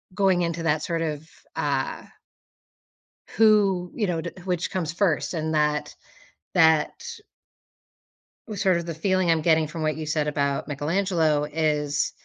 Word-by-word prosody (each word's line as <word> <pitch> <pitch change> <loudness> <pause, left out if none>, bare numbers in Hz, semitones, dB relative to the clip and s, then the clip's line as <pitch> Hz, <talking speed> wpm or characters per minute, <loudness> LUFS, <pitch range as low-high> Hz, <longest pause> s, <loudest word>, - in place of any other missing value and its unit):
going 190 -3 +3
into 170 -1 -2
that 155 -1 +1
sort 165 -1 -2
of, 155 0 -4 0.3
uh - - -1 1.4
who, 200 -5 +4
you 215 -4 0
know, 170 -2 -1
d - - -5
which 180 -2 -2
comes 175 -4 -2
first? 170 -2 0
And 160 0 -2
that 150 -1 0 0.6
that 160 -2 +4 1.6
sort 190 -2 +2
of 170 0 -5
the 165 - -4
feeling 185 +1 +1
I'm 160 -2 +2
getting 160 -2 +3
from 160 0 -5
what 155 -1 0
you 155 0 -6
said 150 -1 0
about 140 -1 -1
Michelangelo 155 0 0
is 150 -1 0
160 Hz, 140 wpm, -25 LUFS, 150-180 Hz, 1.6 s, who